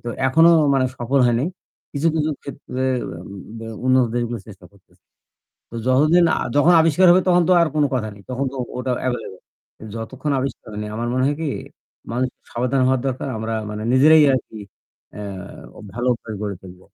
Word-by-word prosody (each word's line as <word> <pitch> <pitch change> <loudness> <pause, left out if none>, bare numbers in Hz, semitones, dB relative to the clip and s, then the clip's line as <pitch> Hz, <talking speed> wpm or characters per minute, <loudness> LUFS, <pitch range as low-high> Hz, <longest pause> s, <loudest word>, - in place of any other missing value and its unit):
তো - - -4 0.2
এখনো 160 +5 +6 0.2
মানে 130 -1 +2
সফল 130 +3 +1
হয় 120 - +2
নাই। 155 - 0 0.4
কিছু, 145 +3 -1
কিছু, 155 -1 0
ক্ষেত্রে 130 -2 -5 0.3
অ্যা 85 -1 -8 0.4
ব্যা 115 0 -8 0.2
উন্নত 130 -1 +4
দেশগুলো 120 -1 -2
চেষ্টা 95 -4 -13
করতেছে। 100 -2 -27 0.7
তো - - -13
যতদিন 155 +7 +4
আ - - -1 0.2
যখন 160 +5 +5
আবিষ্কার 165 +3 +4
হবে 185 +1 +5
তখন 175 -1 +5
তো - - +5
আর 165 - +3
কোনো 150 - +3
কথা 110 -4 -1
নেই। 100 - -15
তখন 130 +2 -2
তো - - -8 0.2
ওটা 125 0 -1
এভেইলেবল। 125 -7 -4 0.5
যতক্ষণ 130 +6 -4
আবিষ্কার 135 -1 -5
হয়নি। 105 0 -5
আমার 120 +2 -3
মনে 130 0 +1
হয় 145 - 0
কি? 155 - -1 0.6
মানুষের 125 +1 -3
সাবধান 125 +2 0
হওয়া 130 0 +2
দরকার 130 +1 -3
আমরা 110 +1 -3 0.2
মানে 105 0 -5
নিজেরাই 155 +4 +6
আরকি 115 -3 -5 0.6
এ্যা 105 - -7 0.7
ভালো 120 +2 -3
অভ্যাস 110 -2 -7
করে 100 -2 -3
তুলবো। 90 -1 -13
130 Hz, 180 wpm, -21 LUFS, 115-145 Hz, 0.7 s, এখনো